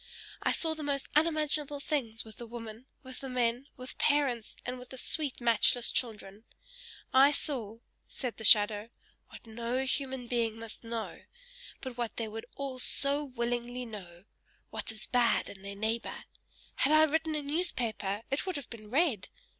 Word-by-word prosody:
I - - +3
saw 320 -1 +2
the 315 - -7
most 280 -2 0
unimaginable 300 -2 +2
things 245 -7 -1
with 220 - -11
the 235 - -7
women, 230 +1 -8 0.2
with 260 -1 -8
the 270 - -6
men, 245 +1 +1
with 255 0 -9
parents, 275 -6 +2
and 250 0 -3
with 250 0 -11
the 260 - -9
sweet, 290 +1 0
matchless 235 0 +4
children; 215 -3 -2 0.7
I 270 +2 +8
saw," 245 -7 -1 0.3
said 250 -4 -4
the 220 - -7
shadow, 210 0 +6 0.4
"what - - -12
no 235 +3 -1
human 265 -1 0
being 230 -2 0
must 225 0 -6
know, 230 -1 -4 0.6
but 260 -2 -6
what 235 -2 -3
they 230 - -1
would 225 +1 -6
all 275 -2 -4
so 280 +3 +3
willingly 245 -1 -2
know 185 -6 -9 0.5
what - - -3
is 215 -1 -6
bad 245 -2 +3
in 195 - -10
their 200 0 -6
neighbor. 220 +3 -2 0.5
Had 290 - +4
I 310 0 +8
written 315 +1 +1
a 300 - -2
newspaper, 235 - -1
it 275 +7 0
would 370 - -1
have 285 -3 -6
been 215 -3 -9
read! 265 - +2
245 Hz, 170 wpm, -31 LUFS, 225-280 Hz, 0.7 s, I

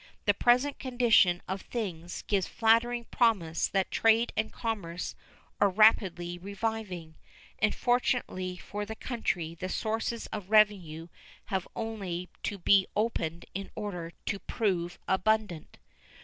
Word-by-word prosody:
The 205 - +5
present 250 +7 +3
condition 235 -9 +3
of 190 +1 -3
things 175 -7 -5
gives 195 -3 0
flattering 235 +1 +2
promise 185 -9 +2
that 195 -1 0
trade 225 +1 +3
and 220 0 -1
commerce 190 -7 -4 0.5
are 200 - +5
rapidly 185 -4 +3
reviving, 200 -4 -4 0.5
and, 215 0 +2
fortunately 240 -7 0
for 205 +3 -5
the 220 +2 -6
country, 185 -10 -2
the 185 +2 -5
sources 225 +3 -2
of 200 -3 -5
revenue 195 -7 +3 0.4
have 190 -2 -2
only 195 -6 -4
to 205 - -3
be 195 +1 +4
opened 170 -7 -1
in 195 +1 -5
order 180 -6 -5
to 200 - -2
prove 180 -7 -1
abundant. 190 -3 0
200 Hz, 125 wpm, -29 LUFS, 180-225 Hz, 0.5 s, The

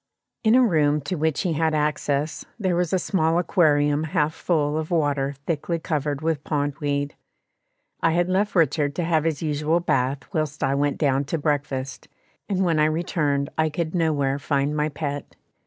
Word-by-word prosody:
In 220 +1 +5
a 255 - +6
room 150 -7 +2
to 140 +7 -3
which 160 -2 0
he 180 -4 0
had 160 0 +1
access, 150 0 -1
there 190 -5 0
was 175 -1 0
a 190 - +3
small 165 -3 +1
aquarium 150 -4 +2
half 150 0 0
full 150 -4 0
of 155 0 -2
water 145 -4 0
thickly 165 +1 -1
covered 150 -3 -2
with 155 -2 -1
pond 145 -1 -1
weed. 145 -1 -1 0.9
I 165 - +3
had 175 +1 +2
left 195 +3 0
Richard 150 -3 +2
to 175 - -1
have 160 -2 +1
his 160 -1 -1
usual 155 +2 +1
bath 135 -4 0
whilst 155 -3 -2
I 135 0 +2
went 145 0 0
down 140 -2 +1
to 160 +4 -2
breakfast, 145 -3 -2 0.4
and 190 -1 +1
when 165 -3 +2
I 150 - +5
returned 155 -3 0
I 160 0 +3
could 160 +1 -3
nowhere 145 -5 +1
find 140 +1 0
my 150 0 0
pet. 145 -1 -5
155 Hz, 180 wpm, -24 LUFS, 145-165 Hz, 0.9 s, a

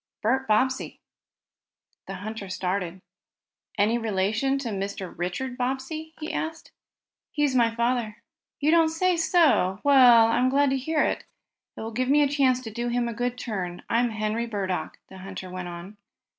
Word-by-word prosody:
"Bert 265 +5 +1
Bobbsey." 255 +5 0 1.1
The 195 - -5
hunter 205 +1 -6
started. 185 -1 -3 0.8
"Any 215 +4 +2
relation 220 +5 0
to 270 -4 -4
Mr. 195 -2 -4
Richard 245 +9 -4
Bobbsey?" 270 +6 -3
he 310 - -5
asked. 320 0 -4 0.6
"He's 295 -3 0
my 230 -2 +2
father." 235 -2 0 0.4
"You 295 +2 +2
don't 330 -1 +5
say 360 +3 +1
so! 320 - +3
Well, 250 -5 +7
I'm 240 +3 +2
glad 280 +1 +3
to - - +2
hear 300 +4 0
that. - - -3 0.5
It - - -6
will 225 +1 -5
give 255 +3 -1
me 295 +1 +5
a - - +3
chance 270 -3 +2
to 225 - -7
do 240 +2 -3
him 240 0 0
a 235 - -3
good 245 +2 -2
turn. 185 -8 -5
I'm 240 +1 +2
Henry 220 +1 -2
Burdock," 195 -5 -3
the 190 - -12
hunter 190 -1 -8
went 180 -1 -5
on. 175 +4 -9
235 Hz, 165 wpm, -26 LUFS, 200-270 Hz, 1.1 s, Well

